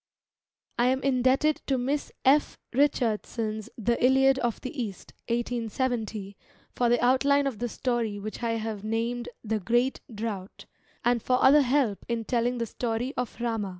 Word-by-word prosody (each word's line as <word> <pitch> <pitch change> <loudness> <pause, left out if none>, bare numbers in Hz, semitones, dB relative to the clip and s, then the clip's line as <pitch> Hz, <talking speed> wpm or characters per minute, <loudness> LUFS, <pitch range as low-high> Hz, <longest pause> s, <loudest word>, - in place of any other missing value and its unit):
I 240 - +4
am 260 +1 +1
indebted 265 +3 +2
to 270 - +2
Miss 275 +4 -1
F. 285 +3 +4 0.2
Richardson's 225 -5 0
The 235 +2 0
Iliad 265 +1 +5
of 240 -3 -1
the 255 - -6
East 200 -5 -7
(1870) 230 -3 -2 0.4
for 240 -1 +1
the 240 0 +3
outline 280 +3 +3
of 260 -7 -2
the 240 - -2
story 235 -4 -1
which 215 +3 -6
I 230 -1 0
have 220 -2 -4
named 230 +2 -2
The 220 -1 -1
Great 240 +6 +1
Drought, 210 -3 -5 0.4
and 240 -1 +3
for 250 +3 +2
other 290 +3 +7
help 255 -6 +1
in 230 -1 -1
telling 245 +1 0
the 230 - -1
story 235 +3 -3
of 250 -1 -4
Rama. 225 -4 -1
240 Hz, 155 wpm, -27 LUFS, 225-260 Hz, 0.4 s, other